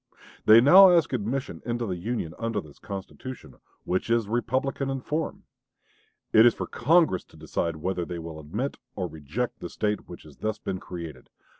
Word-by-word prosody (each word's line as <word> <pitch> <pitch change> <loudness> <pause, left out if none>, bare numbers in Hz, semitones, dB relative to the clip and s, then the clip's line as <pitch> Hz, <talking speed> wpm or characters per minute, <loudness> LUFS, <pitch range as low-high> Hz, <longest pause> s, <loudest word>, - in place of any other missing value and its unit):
They 110 +2 +9
now 185 +9 +9
ask 170 -5 +3
admission 120 - -2
into 120 0 -2
the 95 -4 -2
Union 90 -3 -3
under 115 -2 -1
this 75 -6 -12
constitution, 95 - -8 0.3
which 90 +5 -1
is 115 -2 +2
Republican 130 +4 -1
in 135 0 -2
form. 155 +5 -3 0.9
It 110 - +8
is 120 -1 +6
for - - -3
Congress 155 - +3
to - - -19
decide 85 -1 -2
whether 90 +3 -2
they 85 +1 -5
will 80 -1 -7
admit 105 - -4 0.2
or 95 - -2
reject 80 - -4
the - - -6
State 105 -1 -2
which 85 - -10
has 75 -3 -15
thus 110 -1 -2
been 95 -3 -4
created. 85 -8 -8
110 Hz, 175 wpm, -26 LUFS, 85-125 Hz, 0.9 s, They